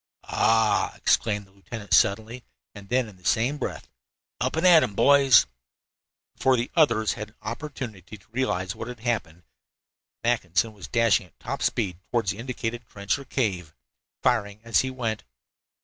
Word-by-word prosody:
"Ah!" 110 -1 +2
exclaimed 105 -3 +1
the 95 - -24
lieutenant 100 +2 -7
suddenly, 110 +4 +2 0.3
and 100 -2 -12
then, 125 -1 +1
in 100 -3 -14
the 90 - -24
same 125 +9 +1
breath: - - -5 0.5
"Up - - -1
and 160 +3 0
at 170 -3 +8
'em, 115 -8 -2
boys!" 140 -3 +6 0.9
Before 130 -1 +3
the 120 - -2
others 115 - +3
had 105 0 -7
an - - -27
opportunity 110 - -7
to 100 - -27
realize 95 -7 -1
what 115 - -6
had 125 -2 -8
happened, 105 -8 -2 0.8
Mackinson 110 -3 +1
was 95 -4 -10
dashing 115 -4 +2
at - - -33
top - - -5
speed 95 -7 -1
toward 120 -3 0
the 100 +1 -3
indicated 120 -1 -4
trench 100 +6 -2
or 140 - -10
cave, 95 - -2 0.5
firing 105 0 +1
as 115 0 +2
he 130 - 0
went. 115 -4 -3
115 Hz, 165 wpm, -25 LUFS, 100-125 Hz, 0.9 s, at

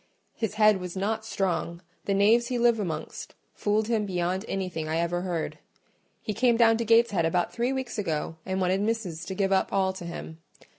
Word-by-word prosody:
His 220 -2 -3
head 215 -1 +5
was 180 0 -6
not 220 +3 -1
strong: 175 -4 -2 0.2
the 200 - +1
knaves 225 +4 +4
he 250 -1 -1
lived 235 -1 +3
amongst 160 -6 -5 0.2
fooled 210 +1 0
him 220 -3 0
beyond 180 +1 -1
anything 180 -5 -3
I 160 - 0
ever 170 +1 0
heard. 175 -3 -3 0.6
He 215 - -2
came 235 +1 +3
down 225 -1 +5
to 235 - -2
Gateshead 225 -5 +4
about 175 +2 0
three 240 +2 0
weeks 260 -4 -3
ago 160 -3 -2
and 190 0 -2
wanted 185 +1 +1
missis 205 -7 -2
to 190 - -5
give 195 0 0
up 190 - +2
all 190 -1 +1
to 185 -2 -8
him. 165 -1 -7
195 Hz, 195 wpm, -27 LUFS, 175-225 Hz, 0.6 s, head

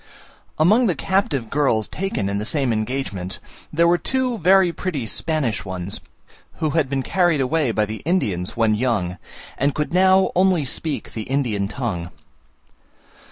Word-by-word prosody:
Among 215 +10 +4
the 180 - +1
captive 145 - -1
girls 135 -7 +1
taken 195 - -2
in 100 0 -1
the - - -3
same 130 +1 +1
engagement, 110 -5 -3 0.3
there 170 +2 +3
were 175 +1 +3
two 255 -3 -1
very 185 0 +4
pretty 155 -11 -3
Spanish 135 -2 -1
ones, 95 0 -5 0.5
who 155 -2 -2
had 155 -4 +1
been 135 -1 -1
carried 175 -3 +2
away 145 +1 +1
by 110 -1 +1
the 110 +1 -5
Indians 105 - -1
when 110 -2 +3
young, 105 -6 -1 0.4
and 140 +1 +1
could 150 +2 -2
now 190 +1 +4
only 180 -4 +3
speak 150 +3 -3
the 110 - -4
Indian 120 -8 0
tongue. 100 -8 -4
140 Hz, 155 wpm, -21 LUFS, 110-175 Hz, 0.5 s, Among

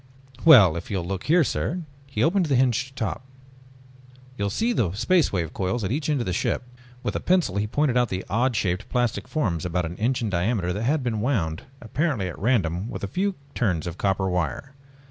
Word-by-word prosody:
"Well, 110 - +8
if 85 - -7
you 100 - -1
will 85 - -3
look 95 +1 -4
here, 170 +2 +5
sir...." 175 +5 -2 0.2
He 135 - -1
opened 175 +2 +2
the 140 - +2
hinged 130 +1 +1
top. 115 +1 -3 1.1
"You 100 - -2
will - - 0
see 230 - 0
the 95 - 0
Space 150 - +2
Wave 85 -5 -2
coils 95 +4 -1
at 95 - -2
each 145 +3 -1
end 150 -2 +1
of - - -2
the 90 - -1
ship." 105 - -1 0.4
With - - -2
a - - 0
pencil 180 - +1
he 105 +1 0
pointed 140 +2 +1
out 125 -2 +3
the 95 0 -4
odd 120 +4 +1
shaped 95 +1 -1
plastic 120 -5 0
forms 95 - -1
about 90 0 -1
an 85 +2 -6
inch 120 +3 0
in 110 - -1
diameter 90 0 0
that 100 - -3
had 145 +2 +1
been 110 -4 -1
wound 95 - -1 0.2
apparently 125 - -1
at 85 - -7
random 100 -4 +1
with - - -6
a - - -1
few 195 - -1 0.2
turns 90 -10 0
of 85 0 -6
copper 95 -1 +1
wire. 90 - -2
110 Hz, 220 wpm, -25 LUFS, 90-135 Hz, 1.1 s, Well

